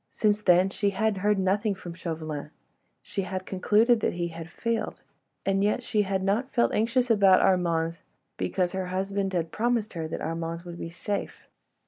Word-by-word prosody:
Since 210 -1 +1
then 185 -1 +4
she 200 0 +1
had 205 +1 0
heard 205 +2 +2
nothing 195 +2 +1
from 175 -2 -8
Chauvelin. 155 -4 -5 0.5
She 200 - -3
had 185 -1 -4
concluded 215 +5 +3
that - - 0
he 175 0 -2
had 165 0 -8
failed, 230 +2 -2 0.5
and 195 0 +2
yet, 210 +4 +1
she 215 -2 +1
had 195 -1 -1
not 215 +7 +1
felt 235 - +2
anxious 240 +3 +2
about 195 -4 +6
Armand, 170 -3 +1 0.4
because 180 -2 0
her 190 -1 -3
husband 195 +1 -1
had 165 -2 -1
promised 230 -1 0
her 165 -3 -3
that 160 - -4
Armand 165 +1 -3
would 175 -1 -8
be 165 - -5
safe. 200 +4 -4
190 Hz, 175 wpm, -27 LUFS, 175-210 Hz, 0.5 s, about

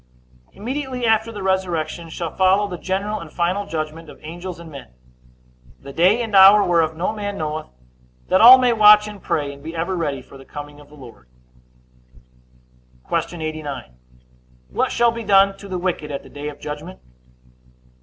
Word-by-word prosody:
A. - - -24
Immediately 255 +3 -4
after 225 0 +2
the 205 -3 -7
resurrection 170 -3 -2
shall 165 0 -6
follow 190 +2 +3
the 180 -3 -7
general 200 +3 -3
and 160 -2 -10
final 185 +4 -1
judgment 155 -1 -5
of - - -13
angels 175 +3 -8
and 165 -1 -11
men; 140 -2 -10 0.9
the 140 0 -11
day 190 - +3
and 220 -3 -3
hour 195 +2 +8
whereof 165 -2 +1
no 180 +5 -1
man 205 -2 -5
knoweth, 155 -1 -4 0.6
that 185 - +3
all 245 +3 +11
may 250 -2 +2
watch 210 -1 +7
and 210 -1 -10
pray, 145 -2 -2
and 140 - -15
be 165 +3 -8
ever 170 +3 -2
ready 145 -6 -3
for 135 +1 -15
the - - -12
coming 145 +1 -10
of 145 - -17
the 150 - -16
Lord. 120 - -14 1.8
Q. - - +1 0.3
89. 150 - -6 0.8
What 60 - -1
shall 235 0 +3
be 230 0 -6
done 195 -1 +4
to 200 - -10
the 185 -2 -4
wicked 175 -4 -3
at 140 -1 -5
the - - -15
day 145 +1 -6
of 145 - -12
judgment? 150 +5 -8
175 Hz, 180 wpm, -21 LUFS, 155-205 Hz, 1.8 s, all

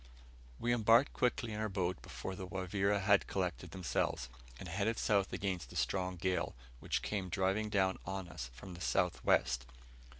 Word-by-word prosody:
We 120 - +2
embarked 115 +4 +5
quickly 120 -2 0
in 105 - -3
our 110 0 0
boat 95 -2 -1
before 95 - -6
the 95 0 -6
Wavira 100 +2 0
had 100 0 +4
collected 90 -2 -2
themselves, 80 -7 -1 0.3
and 90 - -7
headed 100 +6 0
south 100 -2 +2
against 90 -10 -2
a - - -12
strong 95 -1 0
gale, 90 -4 -1 0.2
which - - -1
came 95 -3 -2
driving 95 +4 +1
down 95 -2 +2
on 95 0 -4
us - - -6
from 90 +8 -9
the 85 - -9
south 65 -4 +1
west. 60 0 +3
95 Hz, 170 wpm, -35 LUFS, 90-105 Hz, 0.3 s, embarked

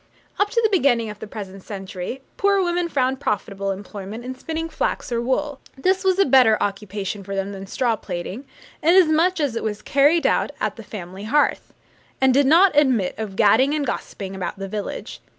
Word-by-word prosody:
Up 410 - +3
to 465 - +1
the 440 - +4
beginning 240 - +2
of 210 - -12
the - - -7
present 195 -2 -8
century, 195 +5 -6
poor 400 -1 +2
women 350 -1 0
found 260 -3 0
profitable 200 -5 -2
employment 205 +3 -7
in 255 - -4
spinning 320 +5 -4
flax 325 - -2
or 235 -1 0
wool. 270 +3 -1 0.2
This 375 +7 +1
was 380 -1 +2
a 390 - +5
better 250 -5 +5
occupation 200 0 -3
for 195 +1 -5
them 195 +1 -2
than 195 -1 -8
straw 235 +2 0
plaiting, 190 +6 -6 0.4
inasmuch 340 +1 +4
as 285 -6 0
it 230 - -2
was 210 -1 -3
carried 290 +3 +3
on - - +2
at 210 - -1
the 230 - -9
family 190 -1 -8
hearth, 290 +6 +1 0.4
and 265 -1 +4
did 280 +1 +4
not 345 +4 +6
admit 255 -10 +3
of 210 -3 -5
gadding 230 +8 +4
and 295 -2 -1
gossiping 195 -5 -5
about 185 -1 -4
the 195 0 -5
village. 205 +1 -6
240 Hz, 190 wpm, -22 LUFS, 200-295 Hz, 0.4 s, not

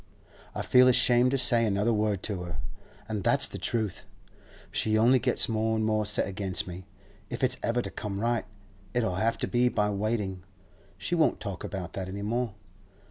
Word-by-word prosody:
I - - -3
feel 125 0 +5
ashamed 125 0 +4
to 135 - +1
say 120 -2 +5
another 105 +2 +1
word 105 -3 0
to 100 -4 -2
her, 85 -3 -6 0.5
and 105 -3 -3
that's - - +3
the - - -8
truth. 110 -5 -2 0.7
She 110 0 +1
only 120 +4 +5
gets - - +3
more 110 0 0
and 110 0 0
more 110 -1 0
set 105 - +2
against 95 -1 -2
me. 90 +1 -9 0.4
If - - -5
it's 130 - +3
ever 120 +1 0
to - - -6
come 100 -2 -5
right, 120 +1 0 0.5
it'll 110 -7 0
have 115 +3 0
to - - -2
be 125 0 +2
by 105 -3 0
waiting; 100 -2 -2 0.7
we - - +3
won't 160 - +2
talk 100 -6 -6
about 95 -4 -6
that 95 -1 -5
any 100 +2 -5
more. 115 0 -2
110 Hz, 190 wpm, -28 LUFS, 100-120 Hz, 0.7 s, feel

